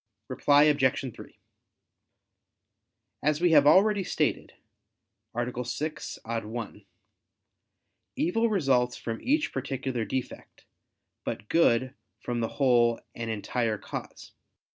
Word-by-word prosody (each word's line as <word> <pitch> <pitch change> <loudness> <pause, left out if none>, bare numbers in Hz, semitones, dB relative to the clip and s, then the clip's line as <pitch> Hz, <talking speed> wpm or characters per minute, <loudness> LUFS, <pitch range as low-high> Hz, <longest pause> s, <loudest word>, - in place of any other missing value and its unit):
Reply 145 0 +4
Obj. 135 -4 +2
3: - - -13 1.8
As 150 0 +1
we 175 0 +3
have 145 -2 +6
already 200 +4 +5
stated - - -1 0.8
(A. 120 +1 -2
6, 150 +6 -5
ad 115 0 -3
1), 110 -2 -7 1.3
"evil 225 +7 +1
results 135 - +1
from 115 -1 -5
each 295 +4 +1
particular 135 -2 -3
defect, 130 +3 -6 0.6
but 105 - -5
good 130 -6 +3 0.3
from 120 -1 -3
the 115 - 0
whole 120 -4 +3
and 115 -1 -5
entire 110 +1 -1
cause." - - -8
130 Hz, 105 wpm, -28 LUFS, 115-150 Hz, 1.8 s, have